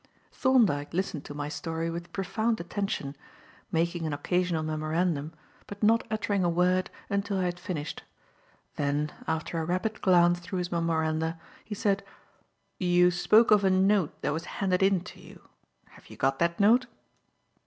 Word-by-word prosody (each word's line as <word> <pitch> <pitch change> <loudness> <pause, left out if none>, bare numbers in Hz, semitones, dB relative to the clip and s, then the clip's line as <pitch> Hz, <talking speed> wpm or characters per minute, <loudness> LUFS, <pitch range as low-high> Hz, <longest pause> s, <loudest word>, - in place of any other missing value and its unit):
Thorndyke 205 - +2
listened 180 -5 -2
to 145 - -8
my 145 0 -3
story 165 +2 -3
with 170 +1 -7
profound 220 +5 -1
attention, 175 -6 -3 0.6
making 170 0 0
an 150 - -2
occasional 175 +2 0
memorandum 155 0 -1 0.4
but 205 +1 -8
not 225 +2 +3
uttering 205 -3 0
a 175 - +2
word 180 +2 +2 0.2
until 200 0 -1
I 185 - 0
had 175 -1 -2
finished. 165 -5 -5 0.8
Then, 145 +1 0 0.2
after 160 +1 -2
a - - -1
rapid 185 +5 -2
glance 175 -2 +4
through 175 +2 -5
his 180 0 -3
memoranda, 160 -1 0 0.2
he 210 - -6
said: 200 -2 0 0.8
"You 180 -1 +4
spoke 215 +6 +4
of 210 -1 +6
a 190 - +4
note 190 -2 +2
that 145 - 0
was 165 +2 -4
handed 185 -2 +1
in 195 -2 +3
to 180 - -12
you. - - -15 0.4
Have - - -18
you - - -12
got 135 0 +1
that 170 0 +1
note?" 235 +5 +5
175 Hz, 160 wpm, -28 LUFS, 160-195 Hz, 0.8 s, of